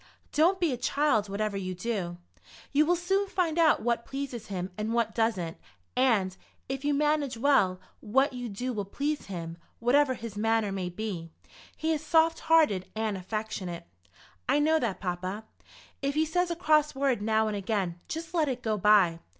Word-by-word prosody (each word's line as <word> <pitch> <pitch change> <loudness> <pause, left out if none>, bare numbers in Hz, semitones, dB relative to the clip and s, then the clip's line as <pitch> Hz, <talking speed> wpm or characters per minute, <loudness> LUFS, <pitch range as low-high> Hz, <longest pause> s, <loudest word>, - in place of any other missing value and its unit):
"Don't 350 +5 +3
be 335 -6 +2
a - - -3
child, 240 -4 +1
whatever 205 +1 -2
you 185 -1 -4
do. 185 -3 -3 0.5
You 300 +2 +3
will 350 - +4
soon 385 +3 0
find 345 -4 0
out 315 -8 +4
what 235 0 +1
pleases 270 -4 -5
him 185 -1 -4
and 215 +3 -2
what 230 -2 +1
doesn't, 205 -8 0 0.4
and, 220 -8 +2 0.3
if 270 +1 -4
you 290 - +1
manage 290 -3 +1
well, 225 -8 +3 0.2
what 265 +6 +2
you 245 -1 -5
do 245 +5 -3
will 205 -3 -2
please 285 +9 -3
him. 170 -3 -6 0.2
Whatever 260 +3 +3
his 230 -3 -7
manner 220 -1 +1
may 190 -2 -3
be, 180 -3 -5 0.5
he 320 +1 0
is 310 -1 -3
soft 325 +1 +3
hearted 300 - +3
and 220 -2 -1
affectionate." 190 -3 -4 0.6
"I - - +4
know 315 +2 +3
that, 230 -8 -2
papa." 185 +3 -3 0.6
"If 275 0 -1
he 310 +1 +3
says 355 +3 0
a 340 - -1
cross 305 -4 +3
word 270 -5 +1
now 220 +1 +2
and 215 - -2
again 195 -4 -2
just 325 +2 -5
let 315 -4 +2
it 255 -1 -4
go 215 -2 0
by. 190 -5 +5
230 Hz, 180 wpm, -28 LUFS, 200-295 Hz, 0.6 s, by